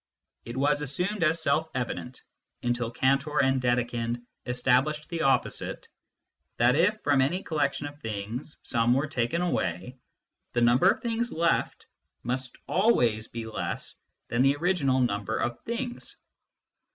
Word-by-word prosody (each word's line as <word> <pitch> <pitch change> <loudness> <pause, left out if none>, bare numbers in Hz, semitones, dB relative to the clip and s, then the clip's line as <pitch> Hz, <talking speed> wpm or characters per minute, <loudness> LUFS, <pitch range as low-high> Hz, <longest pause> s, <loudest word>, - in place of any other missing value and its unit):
It 120 +2 -6
was 145 +2 +2
assumed 180 +8 -1
as 160 0 +2
self 160 +3 +1
evident, 125 0 -4 0.4
until 120 -1 0
Cantor 135 +5 +1
and 130 -1 +3
Dedekind 120 -1 0 0.2
established 130 +5 +1
the 170 -2 -3
opposite, 135 -2 0 0.7
that 120 +3 +4
if, 195 +7 +3
from 145 -2 +3
any 170 +9 0
collection 145 -2 -1
of 145 0 -8
things, 110 +6 -5
some 120 0 +2
were 135 +3 +1
taken 155 +3 -1
away, 125 - -2 0.5
the 120 - +1
number 120 +10 +5
of - - 0
things 235 0 -1
left 170 +1 0 0.4
must 125 +1 -3
always 120 - +2
be 115 -1 -6
less 110 - -4 0.3
than 120 +2 +1
the 135 +2 +4
original 145 -5 +1
number 110 -2 0
of 120 0 -2
things. 240 +1 -4
135 Hz, 140 wpm, -28 LUFS, 120-160 Hz, 0.7 s, number